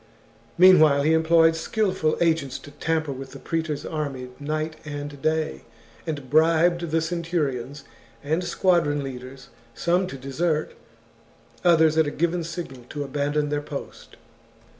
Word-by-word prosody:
] 115 +1 -31
Mean 185 +1 +8
while 140 -2 +5
he 155 +2 +3
employed 160 0 +4
skilful 185 -3 0
agents 160 -6 +1
to 145 - -13
tamper 160 0 -1
with 135 0 -8
the - - -9
praetor's 160 -3 -3
army 140 -5 -4
night 155 +2 -3
and 145 -1 -7
day, 155 +1 -1 0.5
and 145 -4 -4
bribed 165 +3 +3
the 165 +1 +1
centur 165 -2 -1
ions 130 +3 -7 0.4
and 160 +5 0
squadron 170 -6 +1
leaders, 130 0 -9 0.3
some 180 +2 +1
to 135 - -7
desert, 150 +4 -1 0.9
others 160 -2 +4
at 160 - +3
a - - +1
given 170 +3 -1
signal 165 -7 -7
to 145 -1 -4
abandon 145 +2 -1
their 145 0 -1
post. 145 -1 -9
155 Hz, 145 wpm, -24 LUFS, 140-165 Hz, 0.9 s, Mean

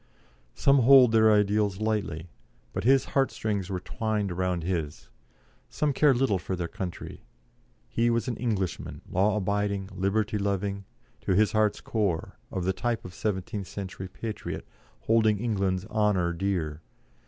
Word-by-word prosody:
Some 140 0 +4
hold 130 -1 +7
their 110 -1 +5
ideals 105 -1 +2
lightly, 100 -7 -2 0.5
but - - -3
his 135 +1 +5
heart 135 -1 +1
strings 100 -4 -3
were 95 -2 -2
twined 110 -2 -2
round 90 -1 -1
his; 80 -4 -3 0.6
some 150 -2 0
care 145 +2 +5
little 120 -7 +1
for 95 - -3
their 90 -1 -3
country 90 0 -6 0.7
he 115 - +1
was 115 +2 0
an 120 - -1
Englishman, 105 -7 -3
law 100 +3 +2
abiding, 100 -1 -1
liberty 105 +3 0
loving, 100 0 -2 0.3
to 100 -2 0
his 105 +2 +4
heart's 110 -1 +1
core, 100 -7 -2
of 90 -2 -3
the 95 - +1
type 115 +2 -2
of 90 - -7
the - - -15
seventeenth 100 -1 -3
century 95 -1 -6
patriot, 110 +3 -6 0.4
holding 110 - +3
England's 100 -4 -1
honour 105 -6 +1
dear. 85 -4 -2
100 Hz, 150 wpm, -27 LUFS, 95-110 Hz, 0.7 s, hold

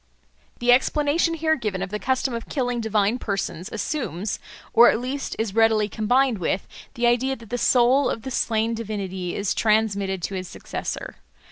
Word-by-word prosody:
The 240 0 +3
explanation 295 +6 +2
here 315 0 +2
given 210 -8 -3
of 195 - -6
the 210 - -3
custom 260 +1 0
of 230 -1 -5
killing 245 -4 -1
divine 220 +1 +1
persons 195 -5 -3
assumes, 210 - -3 0.3
or 240 +1 +8
at - - +1
least 265 +3 -4
is 220 -3 -2
readily 220 -1 +3
combined 240 +3 +1
with, 180 +2 -1 0.3
the 240 - 0
idea 245 +3 +2
that 230 -3 -15
the 245 - 0
soul 255 +3 +4
of 225 - -4
the 265 - -5
slain 225 -1 0
divinity 195 -5 -4
is 200 -1 0
transmitted 200 -4 +1
to 200 - -3
his 185 -1 -4
successor. - - -6
225 Hz, 170 wpm, -24 LUFS, 200-250 Hz, 0.3 s, or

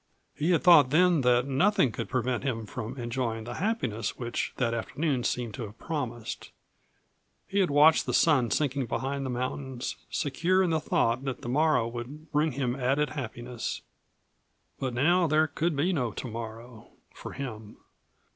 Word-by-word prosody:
He 155 +4 -1
had 170 -4 +3
thought 165 -7 +7
then 170 +1 +4
that 125 -1 +3
nothing 140 - +2
could - - -5
prevent 125 0 -1
him 115 -5 -2
from 115 +4 -6
enjoying 120 -2 -2
the 115 - -6
happiness 180 - -1
which 120 -1 -3
that 115 -2 0
afternoon 130 +3 -1
seemed 120 -2 -2
to 130 - -6
have 105 +2 -12
promised. 120 -7 -5 1.0
He 200 - 0
had 190 - +3
watched 150 +2 +5
the - - -1
sun 140 -8 +4
sinking 140 -3 0
behind 135 +3 -2
the 130 - -3
mountains, 130 +1 -4
secure 170 +6 +1
in 175 - +1
the 160 - +2
thought 120 -3 +1
that 135 -2 -4
the 120 - -4
morrow 145 -3 +3
would 130 +7 -8
bring 150 0 +1
him 125 -2 -1
added 135 +2 0
happiness. 120 -3 -5 1.0
But 130 -3 -2
now 170 +7 +3
there 155 +1 +3
could 160 +1 -1
be 165 +7 +1
no 125 -8 0
tomorrow 115 0 -7 0.3
for - - -9
him. 110 -6 -7
130 Hz, 165 wpm, -28 LUFS, 120-155 Hz, 1.0 s, thought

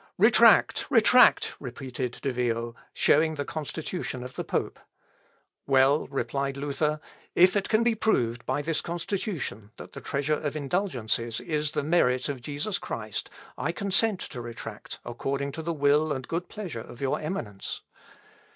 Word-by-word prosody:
"Retract! - - +5
retract!" - - +6
repeated 125 0 -5
De 135 - +1
Vio, 120 -1 -1 0.2
showing 160 +2 +3
the 145 -1 -3
Constitution 155 -3 -4
of 125 0 -8
the - - -4
pope. - - -2 0.9
"Well," 135 +2 +4
replied 135 +1 -2
Luther, 150 +2 -1 0.4
"if 180 +3 +6
it 200 -1 0
can 220 +1 +3
be 235 0 +3
proved 120 - +1
by 145 - 0
this 160 +1 0
Constitution 170 - -3
that - - -11
the - - -8
treasure 140 +2 -1
of 150 -1 -2
indulgences 130 - -1
is 150 -1 -1
the - - 0
merit 135 -5 +2
of 135 -3 -4
Jesus 145 - -2
Christ, 110 -2 -4 0.3
I 160 - 0
consent 200 +2 +1
to 125 - -6
retract 115 -2 -7
according 135 +3 -2
to 160 - -5
the 170 +1 -2
will 150 0 +3
and 130 -3 -3
good 170 +2 -3
pleasure 180 - -5
of 120 +1 -11
your 135 -1 0
Eminence...." 120 - -4
140 Hz, 150 wpm, -27 LUFS, 125-165 Hz, 0.9 s, retract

